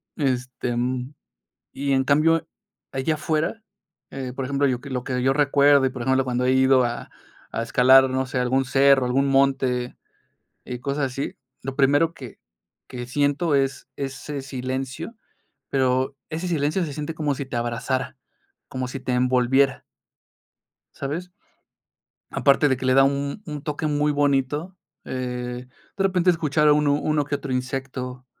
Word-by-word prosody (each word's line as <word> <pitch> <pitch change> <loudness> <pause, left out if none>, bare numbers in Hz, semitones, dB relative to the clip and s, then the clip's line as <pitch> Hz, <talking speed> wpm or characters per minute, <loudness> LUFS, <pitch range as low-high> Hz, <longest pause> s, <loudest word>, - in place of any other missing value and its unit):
este, 130 -3 -2
y - - -1
mm, 125 +2 -2 0.6
en 135 -1 +1
cambio, 155 +4 +3 0.4
allá 135 +4 0
afuera, 155 +7 -1 0.5
eh, 130 -2 -6
por 135 - -3
ejemplo, 140 +1 +1
yo 125 -2 -1
que 140 - -9
lo 125 -2 -3
que 125 -1 -2
yo 135 +1 +3
recuerdo 140 -1 +4
y, - - +2
por 130 -1 -7
ejemplo, 130 +2 +2
cuando 125 0 -1
he 130 - +3
ido 130 0 +5
a 120 0 -3 0.4
a 115 - -1
escalar, 130 +2 +6
no 130 0 0
sé, 130 0 -3
algún 125 +2 +2
cerro, 135 0 +4
algún 135 +3 +1
monte 135 -2 +1 0.7
y 125 -1 -6
cosas 140 +2 -1
así, 135 +2 -4 0.3
lo 135 +1 -5
primero 145 +4 +3
que 130 -7 -11 0.5
que 125 -1 -6
siento 145 +4 +1
es 135 -1 0
ese 140 +1 -5
silencio, 130 - -5 0.6
pero 130 0 +1
ese 165 +3 -3
silencio 160 +2 0
se 150 - -5
siente 150 +2 -4
como 150 -2 -1
si 140 - -4
te 130 - -8
abrazara, 120 +2 -2 0.5
como 130 -1 -4
si 135 - -5
te 130 - -3
envolviera. 125 +2 +2 1.1
¿Sabes? 160 +6 -4 1.0
Aparte 140 +1 +3
de 130 - +2
que 130 - -4
le 130 - +4
da 135 0 +6
un 140 +6 -1
un 150 -3 -6
toque 150 0 -3
muy 150 0 +1
bonito, 145 +5 0 0.3
eh, 125 -1 -4 0.3
de 195 - 0
repente 185 -2 +3
escuchar 155 -3 +1
a - - +7
uno 145 -1 +3
uno 150 -1 +1
que 145 +1 -2
otro 140 -2 -6
insecto, 130 0 -4
135 Hz, 160 wpm, -23 LUFS, 130-145 Hz, 1.1 s, a